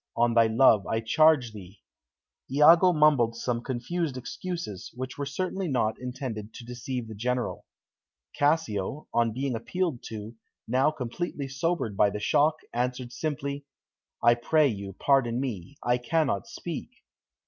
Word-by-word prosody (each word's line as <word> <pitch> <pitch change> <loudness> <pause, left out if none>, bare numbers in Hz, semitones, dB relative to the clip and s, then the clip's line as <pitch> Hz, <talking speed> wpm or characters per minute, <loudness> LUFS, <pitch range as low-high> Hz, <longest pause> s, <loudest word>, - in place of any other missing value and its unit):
On 120 0 +3
thy 115 -1 +5
love, 110 -3 +4
I 110 - 0
charge 135 0 +3
thee." 100 -1 -12 0.7
Iago 165 +6 +7
mumbled 150 -8 +4
some 120 0 -2
confused 130 +4 -3
excuses, 170 - -5
which 130 0 -5
were 140 -1 -4
certainly 185 +5 -2
not 115 -6 0
intended 125 -4 -6
to 120 - -9
deceive 125 0 -5
the 110 - -8
General. 125 +4 -2 0.7
Cassio, 145 -4 0
on 115 -1 +2
being 130 +3 -2
appealed 155 +4 -2
to, 110 0 -7 0.3
now 130 +5 +3
completely 145 +1 -4
sobered 135 - -1
by 100 - +4
the 105 +1 -5
shock, 150 +8 +3 0.2
answered 125 +1 -2
simply, 140 -1 -4 0.6
"I 120 0 +7
pray 145 +5 +3
you, 100 -3 -5
pardon 125 +1 +2
me; 125 -2 -5
I 120 0 +2
cannot 135 - 0
speak." - - -6
125 Hz, 140 wpm, -27 LUFS, 115-145 Hz, 0.7 s, Iago